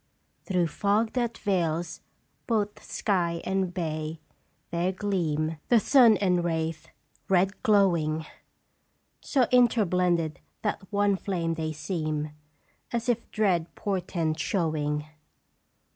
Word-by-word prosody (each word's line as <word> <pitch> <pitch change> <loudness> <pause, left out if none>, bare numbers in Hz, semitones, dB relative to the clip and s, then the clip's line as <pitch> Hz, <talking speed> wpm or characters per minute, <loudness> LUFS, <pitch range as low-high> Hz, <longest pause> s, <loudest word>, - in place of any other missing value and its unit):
"Through 180 -3 +1
fog 205 +7 +1
that 240 -2 -1
veils 170 -4 -1 0.5
both 210 -3 -1
sky 175 -5 0
and 190 -2 0
bay 160 -2 -3 0.5
there 170 +2 0
gleam 165 -6 -1
The 240 - +6
sun 235 -3 +6
and 180 -3 +2
wraith, 160 -1 -2 0.4
red 190 +1 +2
glowing; 170 -7 +2 0.9
So 270 -3 +1
interblended 180 -9 +3 0.3
that 210 - -1
one 205 -1 +2
flame 170 -4 -2
they 160 -1 -3
seem 155 -2 -3 0.6
As 235 +1 -1
if 235 -1 0
dread 180 -6 0
portent 175 -5 -2
showing. 150 -5 -1
180 Hz, 105 wpm, -27 LUFS, 160-205 Hz, 0.9 s, The